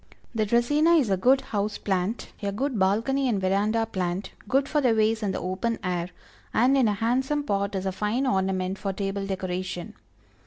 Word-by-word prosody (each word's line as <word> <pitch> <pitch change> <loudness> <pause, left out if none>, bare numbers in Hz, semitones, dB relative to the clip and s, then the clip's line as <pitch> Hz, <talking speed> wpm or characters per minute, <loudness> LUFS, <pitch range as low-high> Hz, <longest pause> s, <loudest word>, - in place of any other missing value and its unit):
The 215 -2 0
Dracæna 295 +9 +4
is 240 -9 0
a - - +4
good 255 +8 +4
house 210 0 -2
plant, 195 +3 -2
a 200 -1 -1
good 250 +2 -2
balcony 230 +8 +2
and 210 -4 +1
veranda 205 +4 +1
plant, 185 -2 -3 0.2
good 270 +5 +2
for 300 0 +1
the 245 -4 +3
vase 220 +1 +2
in 205 -2 0
the - - -3
open 185 +6 -2
air, 180 -1 -2 0.5
and 255 +4 +4
in 260 -4 +4
a 210 - +2
handsome 260 +7 0
pot 200 -5 -1
is 190 0 -2
a 190 - 0
fine 210 +7 -1
ornament 190 -3 0
for 195 -2 -2
table 195 0 -3
decoration. 185 -2 -4
210 Hz, 190 wpm, -26 LUFS, 190-245 Hz, 0.5 s, Dracæna